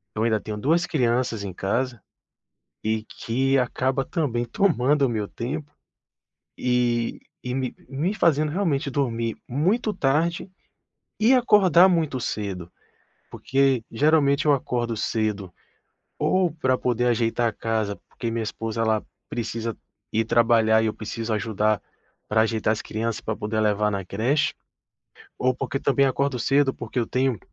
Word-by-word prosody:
eu 110 - -1
ainda 110 -2 +2
tenho 105 0 -6
2 165 +10 +2
crianças 120 -6 0
em 95 - -4
casa, 120 +6 -1 0.8
e 110 0 0
que 135 +5 0
acaba 130 +2 0
também 130 -9 -1
tomando 145 - +2
o - - 0
meu 105 -3 -2
tempo, 145 +5 -5 0.9
e 120 -2 0 0.2
e 125 0 -3
me 130 -2 -2
me 155 +10 -1
fazendo 155 -5 +2
realmente 160 -8 0
dormir 115 -4 -1
muito 195 - +1
tarde, 170 +4 0 0.7
e 225 +4 +4
acordar 190 - +6
muito 160 -7 0
cedo. 95 -6 -4 0.6
Porque 135 -2 +1
geralmente 145 +2 +3
eu 145 - +6
acordo 120 -4 -1
cedo, 105 -6 -2 0.7
ou 185 -4 +2
para 130 -5 0
poder 125 0 0
ajeitar 120 0 +1
a - - -3
casa, 110 -2 -2
porque 115 -2 -4
minha 115 0 -2
esposa 115 +1 -3
ela 110 -1 +1 0.2
precisa 115 -1 -3 0.4
ir 110 +1 +2
trabalhar 115 -1 +4
e - - +1
eu 110 - -1
preciso 110 +1 -4
ajudar 105 -1 0 0.5
para 110 +1 +3
ajeitar 110 -1 0
as 110 - -3
crianças, 115 +1 -3
para 110 - -3
poder 110 +1 -3
levar 105 0 +2
na 100 -2 -3
creche, 135 - 0 0.8
ou 130 0 +2
porque 135 +1 -3
também 140 0 +2
acordo 140 0 0
cedo, 135 +2 +2
porque 120 +2 -5
eu 115 - +1
tenho 130 -4 0
120 Hz, 145 wpm, -24 LUFS, 110-140 Hz, 0.9 s, acordar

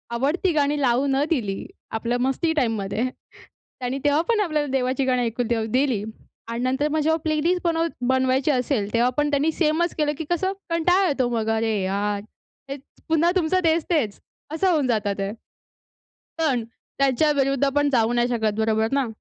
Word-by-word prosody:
आवडती 305 +9 +1
गाणी 295 0 +1
लावू 255 +1 +2
न 270 +1 +2
दिली. 210 -11 -1 0.3
आपल्या 235 +2 -1
मस्ती 270 +6 0
टाईममध्ये. 225 -5 -1 0.8
त्यांनी 255 +2 -3
तेव्हा 290 +2 +4
पण 450 -2 +3
आपल्याला 305 -7 0
देवाची 260 0 0
गाणी 250 -1 +1
ऐकून 235 +1 -2
तेव्हा 225 -2 0
दिली 255 -6 +1 0.4
आणि 235 +1 -3
नंतर 265 +3 +1
मग 310 +1 0
जेव्हा 320 +2 +2
प्लेलिस्ट 320 +3 +1
बनव 330 -1 +1 0.2
बनवायची 260 +2 +2
असेल. 250 -5 -1
तेव्हा 240 +2 +3
पण 295 0 +2
त्यांनी 290 +2 +1
सेमच 325 +2 0
केलं, 300 -2 +1
की 320 - -4
कसं 375 +2 0 0.2
कंटाळा 355 +3 +3
येतो 260 -5 0
मग. 225 -2 -1
अरे 225 0 +1
यार, 200 +2 -1 0.5
हेच 275 0 -6 0.3
पुन्हा 325 +2 +3
तुमचं 370 +1 +2
तेच-तेच 320 - +1 0.3
असं 375 +4 +1
होऊन 295 -6 +1
जातं 215 -4 0
ते. 195 0 -2 1.1
पण 275 -8 +1 0.4
त्यांच्याविरुद्ध 275 0 +2
आपण 290 +1 +2
जाऊ 235 -3 +2
नाही 240 0 +2
शकत 220 -3 0
बरोबर 220 0 +1
ना. 275 -3 +1
270 Hz, 165 wpm, -23 LUFS, 235-310 Hz, 1.1 s, तेव्हा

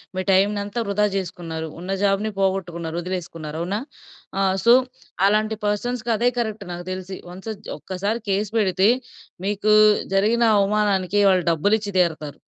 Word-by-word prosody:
మీ 185 - -1
time 195 +2 +4
అంతా 205 +3 -4
వృధా 210 +1 +2
చేసుకున్నారు. 165 -3 -5
ఉన్న 185 +2 -5
జాబ్‌ని 200 +2 +1
పోగొట్టుకున్నారు 175 -4 -1
వదిలేసుకున్నారు 165 -4 -5
అవునా? 190 +5 -2 0.6
ఆ! - - +2 0.2
సో, 235 - +8 0.5
అలాంటి 215 +2 +1
పర్సన్స్‌కి 235 +3 -1
అదే 240 +3 +3
కరెక్ట్ 220 -3 -3
నాకు 175 0 -7
తెలిసి. 185 0 -6
వన్స్ 190 +5 -8 0.3
ఒక్కసారి 200 +5 -3
కేస్ 200 +2 0
పెడితే 190 -1 +3 0.6
మీకు 210 +1 +1 0.4
జరిగిన 220 +5 +3
అవమానానికి 200 -1 +1
వాళ్ళు 185 -3 +2
డబ్బులు 185 +7 +2
ఇచ్చి 205 -1 -5
తీరుతారు. 155 -4 -1
195 Hz, 140 wpm, -22 LUFS, 180-210 Hz, 0.6 s, సో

